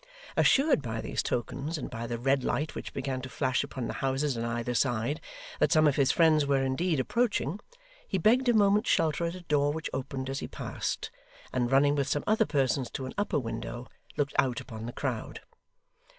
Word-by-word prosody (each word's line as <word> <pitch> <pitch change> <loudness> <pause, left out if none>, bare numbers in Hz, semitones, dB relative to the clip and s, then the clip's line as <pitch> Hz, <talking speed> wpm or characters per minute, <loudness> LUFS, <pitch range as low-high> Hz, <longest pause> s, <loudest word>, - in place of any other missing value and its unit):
Assured 275 - +4
by 115 -3 -4
these - - -2
tokens, 140 +7 -2
and 140 - -4
by 115 -1 -5
the 120 0 -3
red 135 +2 +1
light 155 +2 -1
which - - -6
began 130 -1 -3
to 130 - -7
flash 130 0 0
upon 135 -3 -5
the - - -3
houses 135 +1 0
on 115 - -3
either 120 +1 -2
side, 125 +3 0 0.4
that - - +3
some 155 -1 +5
of 145 - +3
his 140 -2 +3
friends 160 -3 +4
were 140 -1 +2
indeed 150 +4 0
approaching, 210 - 0 0.5
he - - -1
begged 245 +4 +4
a - - +5
moment's 210 +1 +4
shelter 160 0 +2
at 170 +1 -3
a 185 - -8
door 145 -3 +2
which 160 +1 -4
opened 130 0 -4
as 135 +1 -3
he - - -5
passed, - - -4 0.4
and 125 -1 +1
running 140 +2 +5
with 140 -2 0
some 145 - 0
other 220 0 +3
persons 135 -2 +1
to 130 - -5
an 130 - -6
upper 205 0 0
window, 120 -1 -4 0.3
looked 145 -1 0
out 130 -4 +2
upon 110 0 -7
the - - -4
crowd. - - -4
140 Hz, 205 wpm, -29 LUFS, 130-160 Hz, 0.5 s, some